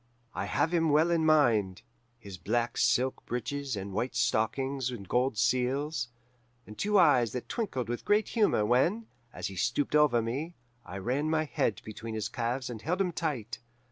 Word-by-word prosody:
"I - - -3
have 155 +4 0
him 165 -2 +2
well 155 +4 +4
in 160 -2 +2
mind: 115 -12 +3 0.3
his 100 -6 -10
black 115 +6 -1
silk 130 +1 +1
breeches 130 +2 -3
and 100 0 -6
white 120 +6 -2
stockings 130 +4 0
and 110 -6 -7
gold 125 +1 +1
seals, 130 +3 0 0.6
and 105 - -11
two 210 - +1
eyes 145 - +4
that 125 - -5
twinkled 135 - -3
with 120 +1 -4
great 210 +1 +2
humour 210 - +2
when, 165 - +2 0.3
as - - -6
he 95 - -4
stooped 145 +10 0
over 150 -5 +4
me, 135 +10 -3 0.3
I 95 - -8
ran 130 +10 -1
my 155 0 +2
head 120 -8 -1
between 110 +1 -7
his 110 0 -3
calves 125 +2 -2
and 115 -3 -6
held 180 +8 -1
him 185 -2 +1
tight. 130 -8 -3
125 Hz, 175 wpm, -29 LUFS, 115-155 Hz, 0.6 s, well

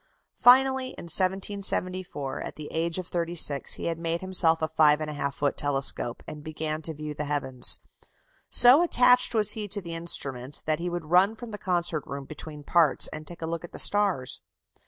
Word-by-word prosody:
Finally, 260 +1 +4
in - - -9
1774, 185 -4 -1
at - - -7
the 150 -1 -9
age 165 +1 -2
of 185 - -5
thirty 170 0 -4
six, 145 -4 +2
he - - -7
had 165 -1 -3
made 165 0 -2
himself 180 -3 +4
a - - +1
5 155 -2 +3
1/2 150 -2 -4
foot 145 -1 -1
telescope, 135 -4 -2
and 150 -1 -9
began 155 0 -5
to 160 0 -2
view 150 0 -7
the 150 0 -5
heavens. 140 -3 0 0.7
So 250 +6 +7
attached 250 -7 +4
was 210 -2 +6
he 215 -2 -3
to 205 +1 -4
the 170 -3 -8
instrument 140 -5 -5
that 155 0 -1
he 175 +1 -4
would 175 -2 -6
run 190 +5 +3
from 235 0 -10
the 210 - -8
concert 175 -5 -2
room 140 0 -7
between 150 0 -10
the - - -20
parts, 165 -5 +3
and 155 0 -8
take 170 -1 -8
a - - -2
look 165 +1 -5
at 175 - -12
the - - -8
stars. 195 -11 +1
165 Hz, 200 wpm, -25 LUFS, 150-190 Hz, 0.7 s, So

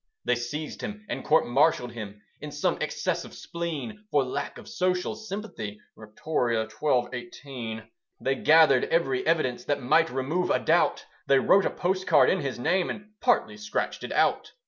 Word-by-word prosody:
They 125 - +3
seized 145 +6 -5
him 210 0 -6
and - - -4
court 155 +1 +3
martialled 125 -1 +2
him, 105 -3 -8 0.2
In 150 - -7
some 145 0 -1
excess - - -1
of - - -12
spleen, 170 +6 -5
For 145 -6 +3
lack 130 - -4
of - - -12
social 180 0 -1
sympathy, 195 - -6 0.2
(Victoria 115 0 -2
xii. 125 +3 +1
18). 120 -2 -7 0.4
They 135 - 0
gathered 150 -2 +5
every 135 -6 +1
evidence 155 -7 +1
That 140 -2 -1
might 165 +6 +4
remove 145 +8 -1
a - - +3
doubt: - - +2 0.2
They 140 - +5
wrote 195 +8 +4
a - - 0
postcard 185 +1 +3
in 190 - +1
his 140 -5 -3
name, 175 +8 +1
And 210 0 -7
partly 245 -3 +2
scratched 215 0 -3
it - - -6
out. - - +1
145 Hz, 170 wpm, -27 LUFS, 125-180 Hz, 0.4 s, gathered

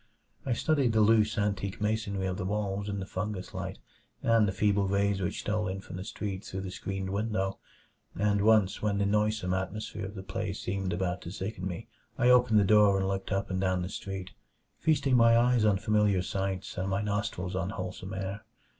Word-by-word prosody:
I 125 - +2
studied 140 -2 +2
the 110 - +4
loose, 110 +1 +4
antique 100 -2 -1
masonry 105 -2 -1
of 90 -1 -2
the 95 - -3
walls 100 0 -2
in 100 -1 -2
the 95 - -4
fungus 95 0 -4
light - - -5 0.5
and 115 -2 +4
the - - +1
feeble 100 0 +2
rays 100 0 +1
which 95 +2 -2
stole 105 0 -1
in 95 +1 -3
from 90 - -8
the 95 - -5
street 100 -2 -5
through 95 - -5
the 95 -1 -5
screened 95 0 -4
window; 100 -2 -1 0.6
and 105 0 +2
once, 105 -2 +4
when 105 -1 +1
the 100 - +1
noisome 105 -2 +1
atmosphere 100 +2 -3
of 100 - -10
the 95 - -6
place 100 +1 -4
seemed 95 0 -2
about 90 0 -1
to - - -7
sicken 95 -1 -4
me, 90 -3 -6 0.3
I 125 +1 +5
opened 125 -3 +5
the - - +4
door 105 -1 +5
and 95 0 0
looked 95 +1 -3
up 95 0 -1
and 95 0 -1
down 95 -1 +1
the 90 - -4
street, 95 -2 -6 0.5
feasting 145 -4 +2
my 115 -1 +6
eyes 120 -1 +4
on 105 -2 +4
familiar 105 -2 +2
sights 95 0 -3
and 95 +1 -1
my 100 +2 0
nostrils 100 -3 -2
on 95 0 -1
wholesome 95 -1 -5
air. 95 +2 -4
100 Hz, 205 wpm, -29 LUFS, 95-105 Hz, 0.6 s, my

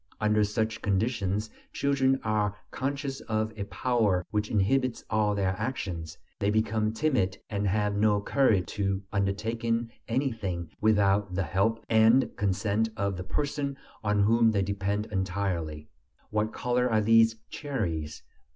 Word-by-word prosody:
Under 105 0 +3
such 110 +1 -1
conditions 105 0 0 0.2
children 135 -1 +2
are 105 -2 0 0.2
conscious 140 0 -3
of 110 0 -2
a 100 -2 -4
power 100 -2 +1
which 105 0 -1
inhibits 115 +5 +1
all 105 -1 +2
their 95 -1 0
actions; 90 -9 -4 0.2
they 100 - +1
become 110 0 +1
timid, 110 -7 0
and 100 -1 0
have 105 +1 +1
no 105 0 +3
courage 105 -4 +2
to 100 -1 0
undertake 100 +4 -1 0.4
anything 110 - -2
without 100 -3 +3
the 95 - +1
help 100 +7 0
and 115 +4 +4
consent 100 +3 0
of 100 -1 -1
the 90 - -5
person 140 +6 -2 0.3
on 105 -1 +2
whom 115 +2 +4
they 100 -3 +1
depend 100 +1 -1
entirely. 90 -6 -2 0.4
"What 105 +1 0
color 125 0 0
are 110 -1 +3
these 115 +1 +5 0.2
cherries?" 85 - -3
105 Hz, 135 wpm, -28 LUFS, 100-115 Hz, 0.4 s, these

